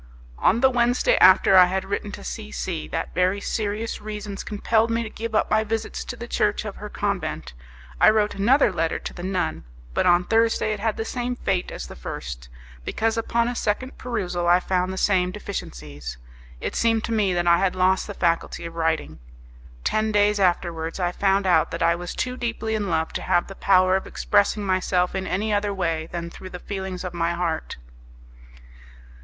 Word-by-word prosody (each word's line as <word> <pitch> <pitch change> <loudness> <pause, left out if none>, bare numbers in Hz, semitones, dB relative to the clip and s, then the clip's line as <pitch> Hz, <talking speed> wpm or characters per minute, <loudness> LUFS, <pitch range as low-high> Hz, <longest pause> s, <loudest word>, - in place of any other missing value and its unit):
On 225 +6 +3
the 265 - +6
Wednesday 245 - +3
after 195 - +6
I 185 -1 +9
had 190 +1 -2
written 200 +1 -3
to - - -8
C 60 +3 -6
C 60 +4 -4
that - - -4
very 185 +2 +2
serious 215 +2 -3
reasons 210 -1 -6
compelled 220 +2 +1
me 230 0 0
to 220 - -7
give 225 0 -5
up - - +1
my 215 0 +3
visits 220 0 -3
to 245 - -5
the 235 0 -8
church 210 -1 0
of 205 - -6
her 210 - -7
convent, 200 - -3 0.5
I - - +7
wrote 215 -1 +2
another 235 +4 +3
letter 165 -1 0
to - - -7
the - - -8
nun, 180 - -2 0.3
but - - +1
on 175 0 +5
Thursday 225 +1 +2
it 210 - -5
had 220 +1 -1
the 225 - -2
same 245 +1 -3
fate 190 -6 -1
as - - -6
the - - -10
first, 60 -1 -7 0.3
because 225 - 0
upon 230 +1 0
a 245 - -1
second 245 +3 -2
perusal 180 -8 -2
I 175 +1 +6
found 185 0 0
the 190 - -5
same 185 -2 +2
deficiencies. 75 - -7 0.4
It - - -4
seemed 225 -1 +2
to - - -3
me 210 -4 +2
that 175 0 0
I 170 0 +5
had 190 -2 +1
lost 185 +1 +2
the 205 - -6
faculty 170 -1 0
of 165 - -7
writing. 160 - -1 0.6
Ten 215 0 +1
days 205 0 +3
afterwards 170 -2 0
I 175 -1 +1
found 195 +1 +1
out 165 -3 +3
that - - -3
I 170 0 +4
was 175 +1 -6
too 250 0 -2
deeply 230 -2 -2
in 210 -3 -1
love 160 -1 0
to - - -3
have 175 - +2
the 195 - -9
power 185 -1 +4
of 190 - -2
expressing 205 0 +1
myself 185 -1 +1
in 190 0 -3
any 210 +4 -1
other 205 0 +1
way 165 -4 -1
than 170 -1 -5
through 185 - -10
the 180 - -7
feelings 190 -1 -5
of 180 -2 -5
my 170 0 0
heart. 170 -2 -3
195 Hz, 200 wpm, -24 LUFS, 175-215 Hz, 0.6 s, I